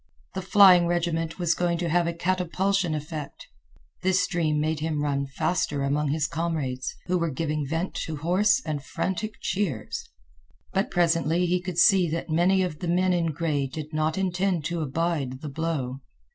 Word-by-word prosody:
The 190 Hz, -, -3 dB
flying 185 Hz, -2 st, +6 dB
regiment 165 Hz, -1 st, -1 dB
was 175 Hz, -2 st, +2 dB
going 175 Hz, 0 st, 0 dB
to 170 Hz, 0 st, -2 dB
have 175 Hz, +1 st, +2 dB
a 170 Hz, -, -1 dB
catapultian 185 Hz, 0 st, 0 dB
effect. 150 Hz, -1 st, -6 dB, 0.6 s
This 185 Hz, 0 st, +2 dB
dream 155 Hz, -3 st, 0 dB
made 155 Hz, 0 st, 0 dB
him 155 Hz, -1 st, -1 dB
run 140 Hz, -1 st, -1 dB
faster 145 Hz, 0 st, -1 dB
among 145 Hz, +2 st, 0 dB
his 150 Hz, +1 st, +1 dB
comrades, 155 Hz, -6 st, -2 dB
who 180 Hz, 0 st, 0 dB
were 170 Hz, -1 st, 0 dB
giving 150 Hz, 0 st, -2 dB
vent 165 Hz, +5 st, -2 dB
to 160 Hz, -, -4 dB
hoarse 195 Hz, -, +2 dB
and 150 Hz, -3 st, -3 dB
frantic 210 Hz, +7 st, -3 dB
cheers. 180 Hz, -, -2 dB, 0.6 s
But 195 Hz, +2 st, +1 dB
presently 170 Hz, -1 st, +2 dB
he 180 Hz, +1 st, +1 dB
could 180 Hz, -2 st, -5 dB
see 180 Hz, -1 st, +5 dB
that 165 Hz, +1 st, -3 dB
many 185 Hz, +4 st, +3 dB
of 170 Hz, -5 st, -4 dB
the 175 Hz, -, -4 dB
men 180 Hz, +2 st, +2 dB
in 170 Hz, -2 st, +1 dB
gray 155 Hz, -3 st, -1 dB
did 155 Hz, +3 st, -7 dB
not 155 Hz, +2 st, 0 dB
intend 185 Hz, -3 st, 0 dB
to 170 Hz, -1 st, -2 dB
abide 145 Hz, -3 st, -2 dB
the 150 Hz, -, -5 dB
blow. 140 Hz, -4 st, -3 dB
165 Hz, 175 wpm, -26 LUFS, 150-180 Hz, 0.6 s, flying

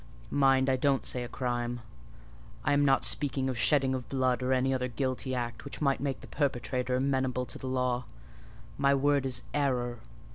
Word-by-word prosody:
Mind, 135 Hz, -1 st, +4 dB
I 130 Hz, -1 st, +3 dB
don't 135 Hz, 0 st, +1 dB
say 125 Hz, -, -1 dB
a -, -, -5 dB
crime; 120 Hz, -1 st, -2 dB, 0.8 s
I 145 Hz, -, +3 dB
am 145 Hz, 0 st, +4 dB
not 135 Hz, -1 st, +4 dB
speaking 135 Hz, -2 st, 0 dB
of 130 Hz, -, -3 dB
shedding 135 Hz, -3 st, +3 dB
of 130 Hz, -2 st, -4 dB
blood 130 Hz, -2 st, +1 dB
or 125 Hz, +1 st, 0 dB
any 130 Hz, +1 st, +2 dB
other 125 Hz, -1 st, -1 dB
guilty 130 Hz, +2 st, -2 dB
act, 120 Hz, -1 st, -4 dB
which 140 Hz, -, -7 dB
might 140 Hz, -2 st, +1 dB
make 140 Hz, -2 st, -2 dB
the -, -, -11 dB
perpetrator 125 Hz, -3 st, -1 dB
amenable 130 Hz, -1 st, 0 dB
to -, -, -8 dB
the 130 Hz, -, -6 dB
law: 125 Hz, -1 st, 0 dB, 0.7 s
my 140 Hz, 0 st, +4 dB
word 140 Hz, 0 st, +2 dB
is 125 Hz, -2 st, -3 dB
error. 125 Hz, -4 st, 0 dB
130 Hz, 185 wpm, -30 LUFS, 125-135 Hz, 0.8 s, Mind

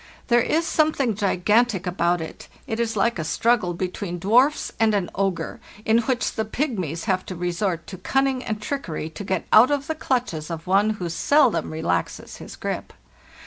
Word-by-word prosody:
There 240 Hz, 0 st, +5 dB
is 325 Hz, +7 st, +1 dB
something 305 Hz, -7 st, +1 dB
gigantic 205 Hz, +1 st, +1 dB
about 175 Hz, -1 st, +1 dB
it; 160 Hz, -, -8 dB, 0.2 s
it 230 Hz, -4 st, -4 dB
is 225 Hz, -2 st, -1 dB
like 235 Hz, 0 st, +1 dB
a -, -, -1 dB
struggle 185 Hz, +1 st, +1 dB
between 180 Hz, 0 st, -4 dB
dwarfs 245 Hz, -, +3 dB
and 220 Hz, -1 st, +3 dB
an 190 Hz, -3 st, -1 dB
ogre, 185 Hz, -4 st, -2 dB, 0.3 s
in 220 Hz, +1 st, +4 dB
which 245 Hz, +1 st, -1 dB
the 220 Hz, -, -1 dB
pygmies 210 Hz, -, -3 dB
have 190 Hz, -3 st, 0 dB
to 185 Hz, -, -5 dB
resort 175 Hz, 0 st, -2 dB
to 185 Hz, 0 st, -9 dB
cunning 270 Hz, +4 st, 0 dB
and 215 Hz, -1 st, -3 dB
trickery 195 Hz, -, -4 dB
to 180 Hz, -, -7 dB
get 190 Hz, -2 st, -2 dB
out 225 Hz, +4 st, +8 dB
of 285 Hz, -1 st, 0 dB
the 320 Hz, -, -2 dB
clutches 245 Hz, -, -2 dB
of 165 Hz, -1 st, -5 dB
one 195 Hz, +3 st, +3 dB
who 180 Hz, -, -3 dB
seldom 260 Hz, -, +2 dB
relaxes 120 Hz, -, -2 dB
his -, -, -10 dB
grip. -, -, -5 dB
205 Hz, 180 wpm, -23 LUFS, 175-245 Hz, 0.3 s, out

